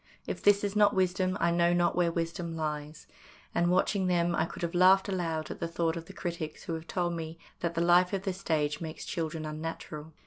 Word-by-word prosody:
If - - -4
this 205 0 +4
is 205 0 -1
not 210 -1 +5
wisdom 185 0 +1
I 170 - +3
know 170 0 +3
not 175 0 +2
where 175 -1 +2
wisdom 165 0 -3
lies, 150 -1 -4 0.5
and, 175 0 +2
watching 185 +1 +2
them, 175 -1 +2
I 160 - +1
could - - -8
have 170 - -2
laughed 185 +2 +5
aloud 165 -5 -2
at - - -7
the 170 - -2
thought 165 0 -1
of 165 -1 -6
the 195 - -11
critics 170 -4 -5
who 165 - -4
have 160 0 -6
told 175 -2 -1
me 165 -1 -5 0.2
that 170 -1 -2
the 165 - +1
life 175 +1 +5
of 195 -2 -2
the 190 - -1
stage 155 -5 -1
makes 160 -1 -6
children 160 -2 -3
unnatural. 155 0 -6
170 Hz, 220 wpm, -30 LUFS, 160-180 Hz, 0.5 s, not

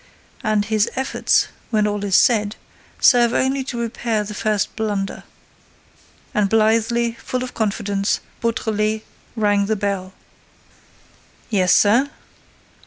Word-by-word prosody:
And 215 -2 +1
his 215 0 +1
efforts, 265 +1 +1 0.2
when 215 -2 +2
all 205 -1 -2
is 195 -2 +1
said, 210 -3 +3 0.4
serve 240 -1 +5
only 265 +1 +1
to 245 - -5
repair 230 -1 -1
the 210 +1 -7
first 210 -1 -1
blunder." 205 -3 -2 1.1
And 210 -4 +1
blithely, 225 +2 +2
full 255 0 -2
of 255 - -7
confidence, 205 -2 -1 0.2
Beautrelet 220 -2 -1 0.3
rang 205 -2 +2
the 220 - +1
bell. 195 -2 -3 1.4
"Yes, 185 -4 +4
sir?" 235 +7 +4
215 Hz, 115 wpm, -20 LUFS, 205-230 Hz, 1.4 s, serve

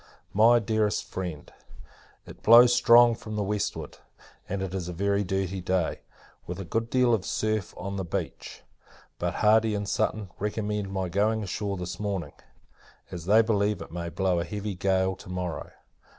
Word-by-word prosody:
MY 115 +4 +6
DEAREST 110 -2 0
FRIEND, 90 -6 -6 0.7
It - - -13
blows 120 +2 +8
strong 120 0 +6
from 110 -2 -7
the 105 - 0
westward, 100 -6 -3 0.5
and 95 0 -2
is 90 -2 -3
a - - -5
very 100 +3 0
dirty 95 0 -2
day, 90 -1 -1 0.5
with 90 +2 -5
a 95 - -5
good 115 +6 -2
deal 125 -1 +3
of 105 -5 +1
surf 110 0 -2
on 100 +2 -5
the 95 - -2
beach; 85 - -5 0.6
but - - -2
Hardy 110 0 +3
and 100 0 -3
Sutton 100 -1 -1
recommended 105 -1 -2
my 95 -1 -2
going 105 +5 +1
on - - -4
shore 100 +1 -3
this 90 0 -6
morning, 100 -4 -3 0.8
as 85 -2 -7
they 110 +4 +5
believe 105 -2 +1
it - - -9
may 85 0 -4
blow 90 +1 0
a - - -1
heavy 105 +4 -4
gale 95 0 +1
to 95 - -13
morrow. 90 -2 -4
100 Hz, 170 wpm, -27 LUFS, 90-110 Hz, 0.8 s, blows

